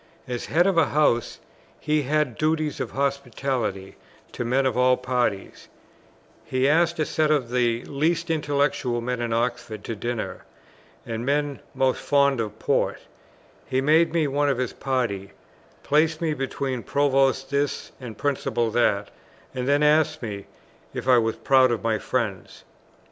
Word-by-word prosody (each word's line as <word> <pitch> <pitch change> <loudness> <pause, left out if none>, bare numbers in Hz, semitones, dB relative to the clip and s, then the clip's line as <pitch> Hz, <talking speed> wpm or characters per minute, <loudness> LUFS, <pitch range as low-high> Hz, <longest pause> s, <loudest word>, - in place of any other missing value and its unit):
As 125 -1 -4
head 170 +4 +3
of 190 -3 +3
a 155 - +4
house 140 -6 +1 0.4
he 150 0 +1
had 145 -3 0
duties 155 -1 0
of - - -3
hospitality 130 -7 -2 0.3
to - - -4
men 130 +3 +1
of 130 - +1
all 125 0 +4
parties; 125 -6 -2 0.8
he 130 +1 0
asked 170 +3 +3
a 155 - +1
set 155 0 +1
of 140 -6 +1
the 120 -1 +1
least 165 +4 0
intellectual 145 -5 0
men 120 +1 -3
in 120 -1 -2
Oxford 115 -2 -2
to 115 - -4
dinner, 110 -4 -4 0.6
and 115 0 -4
men 145 +1 0 0.2
most 130 -1 +1
fond 140 -2 +2
of 105 -1 -5
port; - - 0 0.7
he 130 - +1
made 155 +5 +4
me 165 -2 +1
one 145 +1 +1
of 135 - 0
this 125 -2 -2
party; 115 -8 -2 0.5
placed 155 +2 +2
me 160 -2 0
between 135 -2 -3
Provost 135 +1 +1
This 140 0 -1
and 120 -4 -8
Principal 120 -5 -1
That, 105 -3 +1 0.4
and 125 -1 -3
then 145 +1 +3
asked 155 -1 +3
me 100 -3 -6 0.5
if - - -5
I 125 -2 +6
was 115 -1 0
proud 130 -1 +4
of 115 -4 -2
my 110 -1 +1
friends. 110 -7 -3
130 Hz, 155 wpm, -24 LUFS, 120-145 Hz, 0.8 s, I